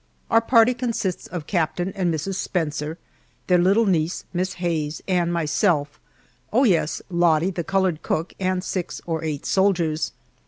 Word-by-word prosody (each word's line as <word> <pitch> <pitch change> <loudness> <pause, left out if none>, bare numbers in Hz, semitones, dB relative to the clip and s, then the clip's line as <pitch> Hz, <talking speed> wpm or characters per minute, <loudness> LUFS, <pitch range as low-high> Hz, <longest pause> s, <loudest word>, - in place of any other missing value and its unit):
Our 225 0 +6
party 230 +1 +5
consists 230 -7 -2
of 175 -5 -6
Captain 175 +1 -1
and 180 -3 0
Mrs. 165 +5 -2
Spencer, 160 -4 -2 0.5
their 180 -1 +4
little 195 +6 +4
niece, 170 -3 0
Miss 185 +1 -1
Hayes, 165 -4 -2
and 175 -2 +1
myself 150 -2 +1 0.5
oh, 250 +5 +4
yes, 165 - +2
Lottie, 170 0 +3
the 175 -2 -3
colored 190 -3 0
cook, 165 +3 -2
and 185 -1 0
six 185 -2 -3
or 165 -1 -2
eight 150 -3 -3
soldiers. 175 -5 +1
175 Hz, 150 wpm, -23 LUFS, 160-190 Hz, 0.5 s, Our